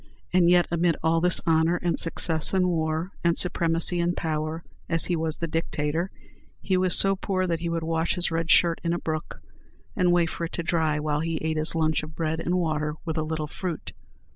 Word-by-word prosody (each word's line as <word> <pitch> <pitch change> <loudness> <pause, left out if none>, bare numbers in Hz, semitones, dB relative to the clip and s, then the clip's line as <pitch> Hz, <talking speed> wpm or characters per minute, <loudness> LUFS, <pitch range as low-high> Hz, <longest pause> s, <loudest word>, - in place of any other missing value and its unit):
And 180 -1 +4
yet 175 0 +4
amid 170 -1 +1
all 165 0 +2
this 180 0 +4
honor 160 +1 +2
and 175 -2 -1
success 165 +1 +2
in 185 -1 +2
war, 160 +1 -1
and 170 0 +2
supremacy 170 0 +2
in 175 +1 0
power, 155 0 -3 0.3
as 165 -1 +4
he 175 - 0
was 160 -1 -2
the 170 - -3
Dictator, 165 +1 -2 0.5
he 190 - -1
was 185 -1 +3
so 195 0 +4
poor 185 -1 -2
that 170 -2 -1
he 170 0 -3
would 165 -1 -2
wash 165 +1 -1
his 175 -2 0
red 165 0 -2
shirt 170 -1 +4
in 170 0 0
a - - -1
brook, 155 -1 -5 0.6
and 180 -1 +2
wait 170 -2 +2
for 170 - -4
it 165 - -9
to 170 - -3
dry 160 -3 0
while 150 0 -1
he 165 +1 -2
ate 160 0 -1
his 155 +2 +4
lunch 160 -1 +1
of 155 0 -10
bread 160 -1 -2
and 175 +2 -1
water, 155 -3 -1
with 160 -2 -2
a - - 0
little 155 0 -3
fruit. 170 +2 -6
165 Hz, 215 wpm, -25 LUFS, 160-175 Hz, 0.6 s, And